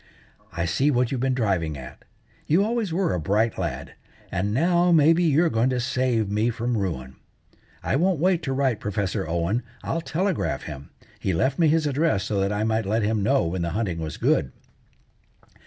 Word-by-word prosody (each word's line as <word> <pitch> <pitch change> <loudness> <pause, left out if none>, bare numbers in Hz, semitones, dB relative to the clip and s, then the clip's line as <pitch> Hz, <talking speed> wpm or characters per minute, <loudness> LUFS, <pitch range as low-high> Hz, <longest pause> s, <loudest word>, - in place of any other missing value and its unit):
"I 85 0 -2
see 130 - +1
what 125 -3 +1
you've 130 -3 -2
been 130 -1 +1
driving 95 - 0
at. 65 0 -11 0.4
You 170 +6 +4
always 225 -4 -1
were 180 +2 0
a 90 - -1
bright 105 +7 0
lad, 80 -8 -4 0.4
and 95 +4 -1
now, 175 +7 +3
maybe, 165 +1 +5
you're 160 +1 +3
going 115 +3 +2
to 125 -1 0
save 125 -3 0
me 105 +4 +1
from 120 +1 -2
ruin. 75 - -3 0.7
I - - 0
won't 180 0 +1
wait 180 +1 +2
to 140 - -3
write 130 -4 0
Professor 100 -5 -2
Owen; 85 +8 0 0.2
I'll 165 - -2
telegraph 180 +2 -1
him. 70 -2 -8 0.3
He 95 - -1
left 130 - 0
me 165 - +5
his 155 +1 +2
address 145 - +1
so 100 0 -1
that 100 +1 0
I 105 +1 -1
might 110 -1 0
let 110 +2 +1
him 110 0 0
know 100 -4 +2
when 85 +2 -2
the 85 - -1
hunting 95 -7 -2
was 80 -1 -5
good." 65 - +1
115 Hz, 190 wpm, -24 LUFS, 95-150 Hz, 0.7 s, maybe